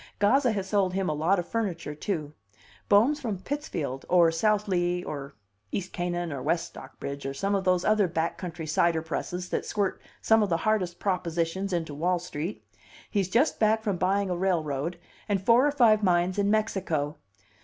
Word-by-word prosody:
Gazza 245 +5 +3
has 195 -2 -3
sold 190 -3 +1
him 190 -1 0
a - - 0
lot 165 +6 +2
of 175 - -3
furniture, 185 -9 -2
too. 150 -2 -3 0.6
Bohm's 235 +9 +5
from 220 -7 -2
Pittsfield, 180 - -4
or 175 -2 +5
South 210 +5 +1
Lee, 175 -1 0
or 140 - -6 0.4
East 190 -1 -4
Canaan, 175 -2 -2
or 135 - -5
West 170 +5 0
Stockbridge, 140 +1 -8
or 135 0 -4
some 195 +7 -1
of 195 -2 0
those 180 -1 +2
other 215 -2 +3
back 165 0 -1
country 175 -3 -6
cider 160 +1 +2
presses 180 +2 -4
that - - -1
squirt 200 -2 -1 0.2
some 225 0 +4
of 205 - +1
the 165 - +2
hardest 185 -2 0
propositions 180 0 -1
into 165 -4 -2
Wall 175 +5 +1
Street. 175 +1 -5 0.5
He's 195 -4 0
just 245 +10 +2
back 220 0 +3
from 205 -5 -1
buying 195 +1 +1
a - - 0
railroad, 170 -3 -1 0.3
and 200 -1 +2
four 235 +8 +4
or - - +2
five 230 -7 +4
mines 180 0 +2
in 200 0 +2
Mexico. 185 -9 0
180 Hz, 185 wpm, -27 LUFS, 165-205 Hz, 0.6 s, Bohm's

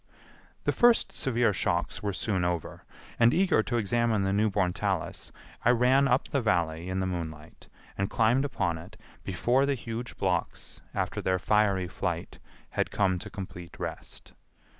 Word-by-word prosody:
The - - +2
first 240 -1 +4
severe 120 -4 +1
shocks - - -1
were 105 - -1
soon 95 -1 -1
over, 85 -2 -3 0.3
and 120 +3 +5
eager 185 -9 +4
to 120 +2 -2
examine 115 -1 +1
the 95 0 0
new 105 +2 +3
born 95 -3 +1
talus - - -3 0.3
I - - +4
ran 125 +3 +4
up 125 0 +2
the 140 - 0
Valley 85 -5 0
in 95 0 -1
the - - 0
moonlight 80 -4 -6 0.3
and 100 - 0
climbed 120 +4 +3
upon 95 - -1
it 95 +6 -13 0.2
before 120 +8 +1
the 140 - +1
huge 115 0 -6
blocks, - - -2
after - - -1
their 95 0 +1
fiery 100 -1 +2
flight, - - -4 0.3
had - - 0
come 95 -3 +1
to 105 - -8
complete 95 -4 -8
rest. - - -7
105 Hz, 160 wpm, -28 LUFS, 90-120 Hz, 0.3 s, and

